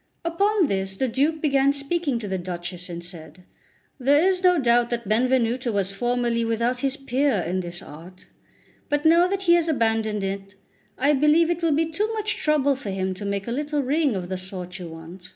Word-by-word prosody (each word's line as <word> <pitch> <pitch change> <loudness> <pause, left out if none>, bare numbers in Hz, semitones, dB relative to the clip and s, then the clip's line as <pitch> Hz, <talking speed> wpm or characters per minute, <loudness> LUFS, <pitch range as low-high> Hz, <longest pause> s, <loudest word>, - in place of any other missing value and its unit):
Upon 395 +3 +2
this 195 -5 -2
the 265 - 0
Duke 290 +7 0
began 275 -2 +3
speaking 280 -1 -1
to 225 -3 -5
the 190 -1 -2
Duchess, 175 0 -6
and 170 0 -6
said: 170 -1 -10 0.6
"There 290 +7 +4
is 370 -1 +1
no 360 -1 +4
doubt 240 -2 +3
that 235 -3 -3
Benvenuto 245 +2 +1
was 200 -2 0
formerly 240 +2 0
without 230 +2 0
his 275 +1 0
peer 275 -1 0
in 180 +3 -1
this 175 -1 -6
art; 170 +5 -13 0.6
but 290 +1 0
now 335 +2 +6
that 390 +1 -2
he 345 -2 +5
has 340 -1 +3
abandoned 225 -6 0
it, 195 0 -5 0.4
I 285 +3 +3
believe 300 +4 +4
it 345 0 -2
will 330 -2 +2
be 320 +3 +2
too 405 +8 -2
much 430 -1 -1
trouble 285 -2 +2
for 255 -6 -7
him 190 -1 -2
to 185 +2 -7
make 200 0 -3
a - - -2
little 295 +2 -1
ring 285 -2 +1
of 180 -2 -4
the 185 0 -4
sort 185 -1 -7
you 175 - -7
want. 165 +3 -11
245 Hz, 205 wpm, -24 LUFS, 190-300 Hz, 0.6 s, now